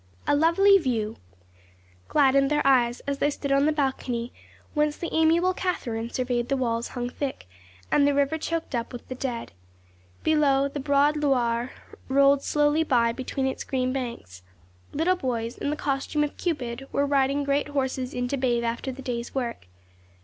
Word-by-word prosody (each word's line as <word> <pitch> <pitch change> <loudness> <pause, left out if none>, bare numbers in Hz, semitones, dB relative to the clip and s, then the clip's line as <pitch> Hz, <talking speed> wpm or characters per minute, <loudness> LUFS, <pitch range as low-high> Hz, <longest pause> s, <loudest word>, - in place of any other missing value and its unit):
A - - +3
lovely 390 +6 +5
view 225 - -2 0.9
gladdened 275 -1 +4
their 295 -1 +1
eyes 245 -3 +3
as 280 0 -3
they 290 - +2
stood 280 -1 -4
on 275 +2 +4
the - - +3
balcony 260 -5 -2 0.4
whence 300 -1 +1
the 340 - -5
amiable 330 +3 +3
Catherine 235 -12 -3
surveyed 245 -1 -1
the 275 - +1
walls 235 -2 -1
hung 245 0 -1
thick, 260 - -5 0.4
and 285 -1 +4
the 285 - +2
river 285 +3 +1
choked 330 -1 -3
up 235 -1 -2
with 245 - -9
the - - -3
dead. 250 -2 -4 0.7
Below, 280 -3 +3
the 285 - -5
broad 285 +2 +2
Loire 245 -4 +1 0.4
rolled 275 +1 +4
slowly 295 +2 +2
by 235 -6 +2
between 260 +2 -3
its 265 - -2
green 255 -1 -1
banks. 235 - -6 0.5
Little 335 +5 +2
boys, 240 -7 -3
in - - -3
the 300 - -1
costume 295 +1 -1
of 295 - -3
Cupid, 270 -6 -3
were 280 - +1
riding 280 0 +1
great 280 +1 0
horses 265 -3 -2
in 245 0 -2
to 280 - -1
bathe 245 -2 +1
after 235 +3 -2
the 270 +1 -9
day's 240 -1 -4
work. 235 - -3
270 Hz, 170 wpm, -26 LUFS, 245-295 Hz, 0.9 s, lovely